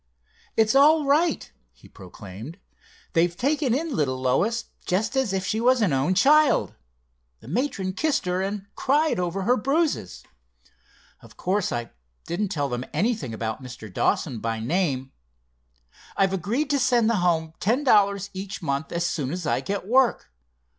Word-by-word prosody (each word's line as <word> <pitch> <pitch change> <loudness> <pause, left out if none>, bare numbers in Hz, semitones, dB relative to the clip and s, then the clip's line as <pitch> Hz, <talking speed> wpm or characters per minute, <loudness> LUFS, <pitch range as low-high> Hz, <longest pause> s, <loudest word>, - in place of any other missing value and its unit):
"It's 220 -1 +4
all 295 +3 +5
right," 305 +3 +1 0.2
he - - -19
proclaimed. 100 - -11 0.6
"They've 170 +1 +2
taken 280 0 +1
in 315 0 -2
little 130 -4 0
Lois, 200 - +1 0.2
just 210 +7 0
as 265 -6 +1
if 190 -1 -2
she 215 +4 -1
was 255 +1 +4
an 200 -10 +2
own 135 +8 +1
child. 295 +8 +4 0.7
The - - -16
matron 195 - -2
kissed 305 -1 0
her, 180 +1 0
and 200 +1 -3
cried 295 -2 +1
over 180 +2 -2
her 245 +6 +3
bruises. 275 - -1 1.0
Of - - -17
course 190 +1 0
I 120 -1 -4 0.3
didn't 200 +5 -2
tell 150 -7 -2
them 125 -1 -3
anything 205 - -1
about 110 +2 -4
Mr. 120 -6 -10
Dawson 115 - 0
by 115 0 -2
name. 135 0 -1 1.1
I've 195 -1 +2
agreed 230 - -1
to 285 - +2
send 240 -3 +3
the 230 -1 +2
home 165 -3 0
ten 240 +9 +1
dollars 200 -5 +3
each 195 +1 -6
month 140 0 -2
as 170 0 -1
soon 150 -6 -2
as 175 +2 -4
I - - 0
get 200 -1 -3
work. 250 - +2
195 Hz, 160 wpm, -24 LUFS, 150-245 Hz, 1.1 s, all